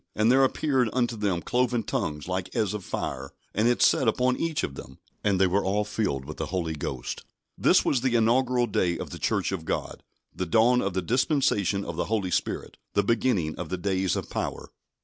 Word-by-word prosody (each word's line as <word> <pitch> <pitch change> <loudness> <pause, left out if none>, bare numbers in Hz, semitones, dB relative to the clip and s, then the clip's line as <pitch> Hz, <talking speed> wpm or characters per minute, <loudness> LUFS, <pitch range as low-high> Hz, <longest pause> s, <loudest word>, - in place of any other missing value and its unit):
And 110 +3 +3
there 135 +1 +5
appeared 130 -2 +1
unto 120 -2 +1
them 100 -5 -1
cloven 125 -2 +1
tongues 75 -5 -3
like 95 0 -3
as 110 -5 +1
of 105 -2 -5
fire, 70 -4 -4 0.2
and 110 +3 +2
it 120 - +3
sat 130 - +4
upon 125 +3 +2
each 165 0 -1
of 70 - -2
them. 65 -1 -10 0.3
And 100 -3 +2
they 95 - +5
were 95 +2 +1
all 105 +2 0
filled 95 -11 -2
with 75 +2 -8
the 80 - -3
Holy 85 -3 -2
Ghost." 65 -4 -5 0.3
This - - +4
was 130 - +2
the 130 -2 +1
inaugural 120 +2 +3
day 90 -6 0
of - - -6
the - - -7
Church - - 0
of 95 -4 -3
God: - - -3 0.3
the 90 - -3
dawn 120 +6 +4
of 95 -1 -2
the 95 - 0
dispensation 110 - +1
of 85 - -6
the 85 - 0
Holy 105 -4 -1
Spirit; - - -2 0.2
the 100 - +3
beginning 105 -7 +1
of 90 -3 -5
the 95 - -2
days 95 0 0
of - - -3
power. - - -4
100 Hz, 210 wpm, -26 LUFS, 90-120 Hz, 0.3 s, there